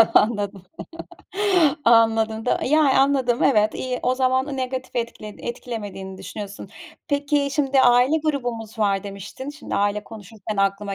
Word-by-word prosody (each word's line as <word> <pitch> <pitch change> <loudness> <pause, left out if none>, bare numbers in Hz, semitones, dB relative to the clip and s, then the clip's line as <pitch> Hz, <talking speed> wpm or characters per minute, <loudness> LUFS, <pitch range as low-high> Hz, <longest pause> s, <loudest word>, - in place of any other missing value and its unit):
anladım, 205 -3 +2 1.2
anladım 225 -1 +3
da, - - +1
yani, 290 -1 +3
anladım. 265 -3 +2
Evet, 215 -5 +3
iyi. 255 -1 -3
O 250 - +2
zaman 260 +2 0
negatif 260 0 -4
etkiled 230 -3 -5
etkilemediğin 205 -6 -6
düşünüyorsun. 200 +1 -8 0.4
Peki, 285 -1 +1
şimdi 275 -2 +2
aile 250 +5 +5
grubumuz 240 -6 -3
var 200 -3 +1
demiştin. 200 +7 -7
Şimdi 290 0 -7
aile 205 +1 0
konuşurken 215 -1 -8
aklıma 195 0 0
235 Hz, 125 wpm, -22 LUFS, 205-265 Hz, 1.2 s, aile